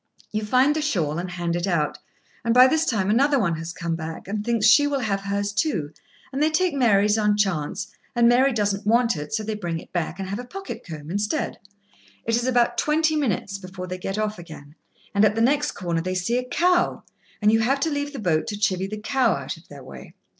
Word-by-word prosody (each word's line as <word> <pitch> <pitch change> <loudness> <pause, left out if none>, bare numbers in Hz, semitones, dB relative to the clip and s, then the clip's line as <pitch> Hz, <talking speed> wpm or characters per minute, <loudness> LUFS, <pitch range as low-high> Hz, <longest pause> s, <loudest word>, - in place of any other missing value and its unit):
You 215 0 -2
find 255 +7 +3
the 310 - 0
shawl, 170 - -1
and 180 +1 -4
hand 175 -1 -2
it 175 +2 -1
out, 150 -5 0 0.4
and 230 +1 +1
by 250 +1 +9
this 315 +4 +2
time 205 -4 +1
another 280 +5 +3
one 170 -9 +1
has 165 +1 -5
come 170 -1 -3
back 160 +1 -7
and 205 +1 -3
thinks 230 -2 +1
she 290 +7 +6
will 280 -2 -1
have 200 -4 -1
hers 200 +1 -2
too, 190 - -1 0.4
and 275 - -2
they 310 - +4
take 345 +2 +1
Mary's 210 -5 +3
on 210 -1 +2
chance, 195 +1 -1 0.2
and 235 0 +5
Mary 255 +3 +4
does 205 -4 +1
not 200 +2 -5
want 235 +1 +3
it, 150 -1 -6
so 220 -1 -1
they 215 +1 -3
bring 175 -6 -3
it - - -12
back 175 -1 -2
and 190 - -4
have 200 +3 -3
a - - -5
pocket 385 +10 -8
comb 155 -2 -8
instead. 205 +2 -2 0.7
It 230 - +1
is 240 +2 0
about 245 -2 +2
twenty 315 +1 +2
minutes 205 -8 -1
before 185 -1 -8
they 185 0 -6
get 195 +2 -4
off 215 -2 -2
again, 155 -4 -11 0.4
and, 200 +1 +3
at 215 0 +4
the - - -1
next 290 +5 +2
corner, 170 -3 -2
they 185 +2 -3
see 230 +7 0
a 250 0 -7
cow, 355 +5 +2 0.4
and 210 0 +4
you 225 - +4
have 265 +5 +1
to 320 - +1
leave 285 0 -2
the 285 - -8
boat 170 -9 0
to 210 - -3
chivy 190 -3 0
the 215 - -5
cow 250 +2 +1
out - - -4
of - - -18
their - - -11
way. - - -12
210 Hz, 240 wpm, -24 LUFS, 180-250 Hz, 0.7 s, by